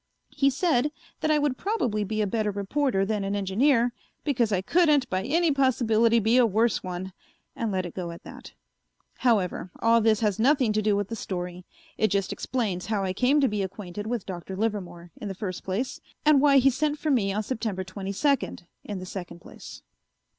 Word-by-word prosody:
He 275 - +2
said 290 -1 +1 0.3
that 310 - -1
I 305 - +4
would 290 -3 0
probably 250 - 0
be 215 +2 -1
a - - +1
better 215 +1 0
reporter 200 +1 0
than 210 -1 -1
an 195 +1 -2
engineer 230 +5 +2 0.3
because 240 -7 +1
I 190 -2 +1
couldn't 300 - +3
by 185 0 0
any 325 - +2
possibility 235 -4 +3
be 225 +2 +3
a 250 - +6
worse 220 +2 +1
one, 185 +1 -6 0.4
and 230 -2 -2
let 185 -1 -1
it 175 - -7
go 180 -2 -4
at 170 - -9
that. - - -11 0.7
However, 205 -7 +1
all 230 0 +4
this 220 -1 +3
has 210 -3 +1
nothing 255 -2 +3
to 215 - +1
do 210 -1 +2
with 200 -1 -2
the 230 - -3
story. 180 -3 -5 0.3
It 215 - +4
just 195 -1 -1
explains 200 -8 -2
how 210 -3 0
I 185 -1 -1
came 255 +8 +3
to 270 - +4
be 210 -3 -1
acquainted 195 +1 -6
with 235 -3 -2
Dr. 185 0 -6
Livermore, 180 -5 -3
in 210 - -6
the 195 - -5
first 185 -2 -5
place, 205 +8 -3 0.2
and 300 -2 +6
why 280 -1 +6
he 270 +1 +5
sent 295 +3 -1
for 305 0 -1
me 210 -7 +2
on 210 +2 -1
September 215 -5 -3
twenty 190 +1 -6
second, 275 -5 0 0.2
in 205 - -5
the 185 - -6
second 180 -2 -7
place. 190 - -12
215 Hz, 205 wpm, -26 LUFS, 190-255 Hz, 0.7 s, a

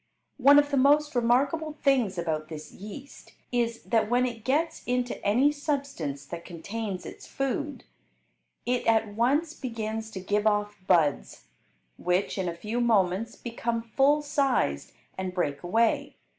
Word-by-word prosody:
One 280 +2 +7
of 290 0 +4
the 280 - +2
most 295 +3 +4
remarkable 270 +6 +1
things 260 -10 +1
about 160 -2 -2
this 155 -1 -8
yeast 215 +8 -11 0.2
is, 235 -2 -1
that 225 -2 +1
when 245 +1 +3
it 230 -3 -5
gets 315 +6 0
into 250 0 -1
any 250 +8 +4
substance 275 - -3
that 170 +3 -7
contains 195 +3 -5
its - - -10
food, 275 +2 -3 0.8
it 250 0 0
at 220 -2 +2
once 285 +9 +1
begins 225 -4 -4
to 210 -3 -7
give 205 +3 0
off 210 0 +1
buds, 160 - +1 0.5
which, 180 +3 0
in 180 -2 0
a 170 - -5
few 220 +6 -2
moments, 215 -1 +2
become 230 -1 -3
full 275 +6 +2
sized 270 - 0 0.3
and 185 -1 -4
break 145 -6 -1
away. 225 +6 +1
230 Hz, 145 wpm, -27 LUFS, 190-275 Hz, 0.8 s, One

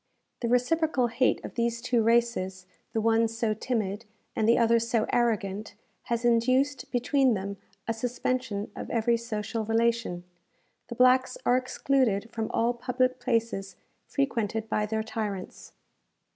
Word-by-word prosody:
The 235 - -1
reciprocal 255 +3 +2
hate 255 +3 +1
of - - -7
these 235 0 -1
two 240 0 +1
races, 225 -5 +1 0.3
the 225 - -1
one 225 +1 +3
so 225 -1 -1
timid, 215 -3 -2 0.3
and 220 0 +2
the 235 - +5
other 230 0 +4
so 230 -1 0
arrogant, 215 -3 0 0.3
has 235 0 -1
induced 255 +3 +2
between 250 0 +2
them 200 +1 -4 0.3
a 230 - +1
suspension 245 -2 -2
of - - -6
every 235 0 +2
social 225 -1 -3
relation. 225 -4 0 0.6
The 235 - -7
blacks 255 - +4
are 245 - +4
excluded 255 -4 +1
from 225 -2 -3
all 235 +1 +1
public 255 +1 0
places 230 -5 -1 0.3
frequented 225 -5 -1
by 210 -1 0
their 220 0 -1
tyrants. 210 -4 -5
230 Hz, 140 wpm, -28 LUFS, 220-250 Hz, 0.6 s, the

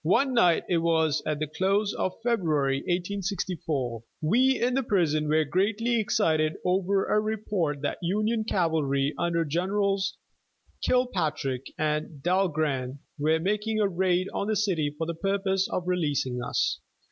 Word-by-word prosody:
One 255 - +2
night, 180 -9 +4
it 175 -2 +2
was 160 -2 +2
at 150 - 0
the 155 - -1
close 195 +6 0
of 185 - -1
February, 155 - +1
1864, 175 - -2 0.2
we 255 +10 +3
in 245 +1 +1
the 270 - +2
prison 165 - +1
were 155 +1 +3
greatly 220 - +1
excited 160 -7 +1
over 190 +2 +1
a 210 - +2
report 200 -9 -2
that 145 - -2
Union 215 +5 0
cavalry 155 -8 0
under 170 -1 +1
Generals 195 +4 0 0.7
Kilpatrick 155 - 0
and 150 -1 -2
Dahlgren 155 -8 0 0.2
were 155 +2 +2
making 210 +5 -1
a 210 - +3
raid 185 0 +1
on 200 - -2
the 215 - +1
city 185 -8 +1
for 160 - -2
the 170 - -3
purpose 195 +2 0
of 180 - -2
releasing 145 -8 0
us. 125 - 0
180 Hz, 145 wpm, -27 LUFS, 155-200 Hz, 0.7 s, night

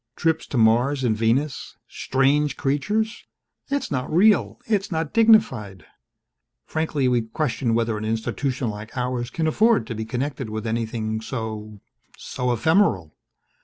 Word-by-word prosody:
Trips 160 0 0
to 135 - -3
Mars 120 +5 +3
and 115 -3 +2
Venus 120 +6 -1
strange 140 +3 +1
creatures.... 210 +11 -1 0.4
It's 280 0 -2
not 130 -2 -2
real 200 +6 +3
it's 205 -3 -1
not 160 -2 -2
dignified. 215 - +3 0.8
Frankly, 155 -4 -1
we 125 -1 +2
question 115 0 -1
whether 115 -2 0
an 110 - -5
institution 115 +3 -2
like 105 +4 -9
ours 125 -1 -2
can 160 +3 -2
afford 210 - +3
to 115 - -5
be 110 0 -4
connected 130 +1 -3
with 110 +1 -5
anything 110 -1 -2
so 110 -3 -6 0.4
so 125 -1 -3
ephemeral. 120 - +2
125 Hz, 135 wpm, -23 LUFS, 110-155 Hz, 0.8 s, Mars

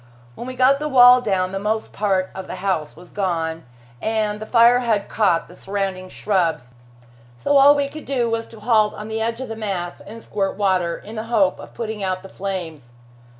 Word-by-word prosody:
When 240 - -8
we 255 - -6
got 260 +2 +4
the 300 0 -3
wall 250 -2 +7
down 185 -5 0
the 195 - -3
most 220 +2 -2
part 190 -3 0
of 190 0 -7
the - - -6
house 185 -5 -2
was 175 0 -15
gone, 165 -6 -2 0.4
and 215 -1 -1
the 215 - -7
fire 235 +1 +5
had 225 -5 0
caught 190 -7 +1
the - - -14
surrounding 190 -1 -4
shrubs, 165 - -1 0.6
so 285 - 0
all 280 +1 +7
we 285 -1 0
could 310 +2 -10
do 250 -4 0
was 230 0 -2
to 225 - -14
halt 215 -2 +2
on 210 +1 -8
the 220 0 -3
edge 230 +2 -2
of 260 - -5
the 225 - -6
mass 195 -5 -4
and 225 +2 -11
squirt 195 -2 -2
water, 185 -4 +1
in 215 +2 -10
the 220 - -4
hope 205 -6 +2
of - - -12
putting 220 -2 -5
out 185 -1 -2
the 190 - -11
flames. 165 -11 -6
210 Hz, 210 wpm, -21 LUFS, 185-230 Hz, 0.6 s, wall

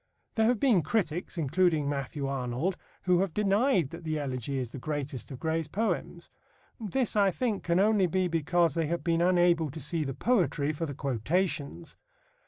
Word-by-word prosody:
There 220 0 +2
have 240 -2 +2
been 235 -9 +4
critics, 175 0 -2
including 160 0 +2
Matthew 140 0 -3
Arnold, 135 +6 -1 0.3
who 180 -1 +3
have 190 -3 -1
denied 205 - +2
that 165 - -9
the 155 -1 -2
Elegy 135 -2 -3
is 125 -3 -3
the 135 - -7
greatest 145 -2 -4
of 130 - -8
Gray's 160 0 -1
poems. 215 +9 -3 0.5
This, 230 +2 -1
I 200 -2 +4
think, 215 0 -1
can 170 +1 +1
only 205 -2 +4
be 185 +2 +1
because 170 0 +1
they 165 -1 0
have 170 +2 -2
been 170 -1 +1
unable 175 -3 +3
to 155 +4 -8
see 155 +3 -1
the 135 -3 -4
poetry 165 - +1
for 165 +2 -3
the 140 - -6
quotations. 145 - -2
165 Hz, 180 wpm, -29 LUFS, 145-190 Hz, 0.5 s, been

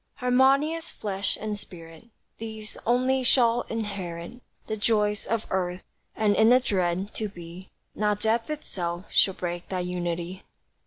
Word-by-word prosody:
Harmonious 275 +6 +3
flesh 200 -1 -2
and 210 -1 -3
spirit, 165 0 -11 0.3
These 220 -1 -6
only 255 +2 +3
shall 240 -2 +3
inherit 200 -1 -4 0.2
The 220 - -2
joys 210 -1 +1
of 230 -1 0
earth, 180 -1 -1 0.3
and 210 -2 +3
in 220 +2 +6
the 250 +1 +7
dread 190 -4 0
To 215 -1 -3
Be 175 0 -10 0.2
Not 210 0 +1
death 225 +3 +1
itself 180 - -3
shall 190 - +4
break 175 -1 -4
that 185 -2 -2
unity. 175 0 -3
210 Hz, 140 wpm, -27 LUFS, 180-230 Hz, 0.3 s, the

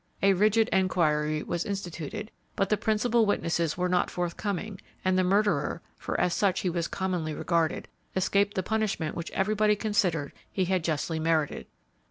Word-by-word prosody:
A 195 0 +6
rigid 215 +3 +3
enquiry 155 -5 +1
was 175 0 -2
instituted, 200 +2 -5 0.2
but 195 - 0
the 215 - +4
principal 220 +1 +2
witnesses 170 -5 0
were 180 0 +1
not 180 0 +1
forthcoming, 190 +3 -3 0.2
and 185 0 +3
the 185 - +3
murderer 180 -5 +1
for - - -3
as 180 -1 +2
such 195 -3 +1
he 180 - 0
was 170 -1 -1
commonly 180 -5 -2
regarded 170 -1 0 0.3
escaped 200 +2 +2
the 185 - 0
punishment 210 -7 -1
which 170 -1 -4
everybody 210 +1 +2
considered 190 -9 0 0.2
he 190 - 0
had 185 -1 0
justly 160 0 -1
merited. 160 -2 0
185 Hz, 160 wpm, -28 LUFS, 165-205 Hz, 0.3 s, A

